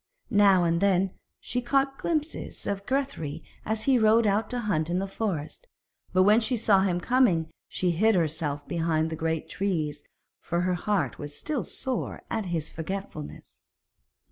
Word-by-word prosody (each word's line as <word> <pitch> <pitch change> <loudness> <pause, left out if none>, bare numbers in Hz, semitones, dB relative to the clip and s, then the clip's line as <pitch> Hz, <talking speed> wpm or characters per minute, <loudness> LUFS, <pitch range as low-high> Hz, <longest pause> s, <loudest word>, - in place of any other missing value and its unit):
Now 200 -4 +5
and 170 0 +1
then 195 -1 +3 0.3
she 250 - -3
caught 270 +2 +1
glimpses 315 -1 -2
of 200 0 -3
Grethari 260 - -2 0.2
as 220 0 -1
he 265 -3 +4
rode 220 +1 +5
out 205 +2 +1
to 245 -1 -2
hunt 170 -8 0
in 175 - 0
the 195 - 0
forest, 195 - -4 0.4
but 185 0 +4
when 210 +3 +6
she 240 +2 0
saw 210 -3 +4
him 180 -2 +1
coming 180 -8 +2 0.2
she 180 -1 0
hid 215 +6 +3
herself 155 -4 -1
behind 165 -2 0
the - - -2
great 160 0 -2
trees, 155 -7 -2 0.4
for 170 0 -1
her 180 0 +1
heart 200 +2 -1
was 145 -1 -6
still 300 -5 -2
sore 260 -2 -3
at 220 -4 -1
his 165 -3 -2
forgetfulness. 160 - -7
190 Hz, 165 wpm, -27 LUFS, 165-225 Hz, 0.4 s, when